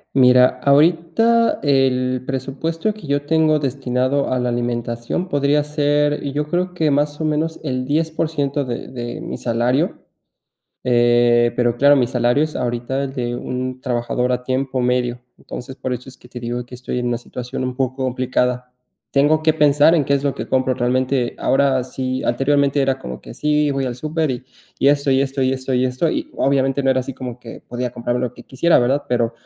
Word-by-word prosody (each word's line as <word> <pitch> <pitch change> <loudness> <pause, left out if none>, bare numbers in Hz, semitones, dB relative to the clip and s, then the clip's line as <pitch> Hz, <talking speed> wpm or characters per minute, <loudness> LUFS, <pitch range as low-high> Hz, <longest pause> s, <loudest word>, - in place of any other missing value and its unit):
Mira, 125 -1 +5
ahorita 170 +11 +3
el 130 -3 +1
presupuesto 140 - -2
que 215 - -12
yo 145 0 -1
tengo 155 -1 +3
destinado 135 0 -1
a 130 - 0
la 125 0 0
alimentación 120 +7 -2
podría 145 0 +2
ser 150 0 +1
yo 150 +2 -2
creo 180 +1 -1
que 160 -4 +1
más 145 +1 0
o - - 0
menos 155 +1 -1
el 130 -3 -2
10%, 150 -1 -1
de 120 -2 -5
de 120 -2 -6
mi - - -5
salario. 125 +7 0 0.9
Em, 120 -1 +3
pero 120 -1 +1
claro, 145 +2 +6
mi 125 -3 +3
salario 125 +3 +2
es 155 - -6
ahorita 125 +2 -2
el 135 -1 -6
de 120 -3 -2
un 130 +1 -4
trabajador 125 0 -1
a 125 0 -1
tiempo 130 0 -1
medio, 125 0 0 0.2
entonces 130 +2 -8
por 130 -2 -3
eso 125 +2 -8
es 130 - -17
que 125 - -17
te 125 0 -8
digo 120 +1 -4
que 125 - -11
estoy 125 0 -4
en 125 - -2
una 120 0 0
situación 125 +1 -6
un 130 0 -3
poco 130 0 -2
complicada. 125 0 -1 0.4
Tengo 150 +3 +3
que 155 0 +3
pensar 150 +1 +5
en 155 -4 +2
qué 140 - 0
es 140 0 +1
lo 140 - 0
que - - -5
compro, 130 0 +1
realmente 125 0 0
ahora 135 -1 +2
sí, 130 0 -3
anteriormente 140 +2 +2
era 135 0 0
como 65 - -8
que - - -10
sí, 150 0 +1
voy 135 -1 -1
al 125 - -3
súper 155 +3 -2
y 125 -1 -4 0.3
y 140 - +4
esto, 140 -1 +2
y 135 0 +3
esto, 135 0 -3
y 130 0 +2
esto, 130 0 -4
y 130 0 +2
esto, 130 +6 0
y 310 0 -3
obviamente 135 0 +1
no 135 - +3
era 130 0 +2
así 130 +1 -6
como 125 -2 -7
que 115 -2 -11
podía 125 +1 -3
comprarme 120 0 -2
lo 125 - -3
que - - -12
quisiera, 165 +6 +2
¿verdad? 130 +4 +1
Pero, 120 -2 +1
130 Hz, 200 wpm, -20 LUFS, 125-145 Hz, 0.9 s, claro